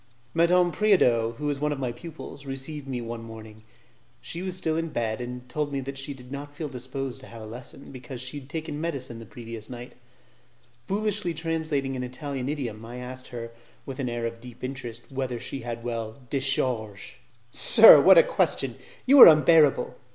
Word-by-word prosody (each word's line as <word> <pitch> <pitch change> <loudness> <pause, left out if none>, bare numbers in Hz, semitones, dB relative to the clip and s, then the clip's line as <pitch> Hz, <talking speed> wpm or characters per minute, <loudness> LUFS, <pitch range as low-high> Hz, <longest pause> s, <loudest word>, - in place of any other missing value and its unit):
Madame 175 +1 +3
Preodot, 125 - +2
who 150 - -7
was 145 -1 -1
one 150 +1 -1
of 145 - -3
my 130 -3 -3
pupils, 145 +1 -10
received 135 +1 -6
me 125 -2 -4
one 115 0 -6
morning; 110 -1 -11 0.6
she 125 +8 -7
was 185 -1 -4
still 160 -3 -1
in 165 0 -2
bed, 115 -3 -3
and 125 +1 -7
told 145 +3 -3
me 140 - -2
that 135 +1 -6
she 135 +1 -5
did 130 -2 -12
not 145 +1 -8
feel 155 +1 -5
disposed 130 0 -6
to 130 - -13
have 115 -1 -11
a - - -8
lesson, 120 +4 -10
because 130 -1 -9
she 130 +3 -5
had 135 -1 -16
taken 155 -1 -5
medicine 130 -8 -5
the 115 - -10
night - - -23
previous. 115 -2 -9 1.2
Foolishly 205 -3 -2
translating 155 -4 -2
an 125 - -4
Italian 130 +1 -5
idiom, 120 -8 -5
I 120 +2 -9
asked 130 +1 -8
her, 115 -2 -8 0.3
with 135 0 -8
an 130 -3 -2
air 120 0 -3
of 115 0 -6
deep 125 0 -13
interest, 120 -3 -6
whether 130 -3 -3
she 135 - -6
had 115 -1 -6
well 115 -2 -5
'decharge'? 125 -4 -2 0.3
"Sir, - - +10
what - - +7
a - - +9
question! - - -1 0.3
You 275 +2 +6
are - - +13
unbearable." 155 -2 +4
130 Hz, 190 wpm, -25 LUFS, 120-150 Hz, 1.2 s, are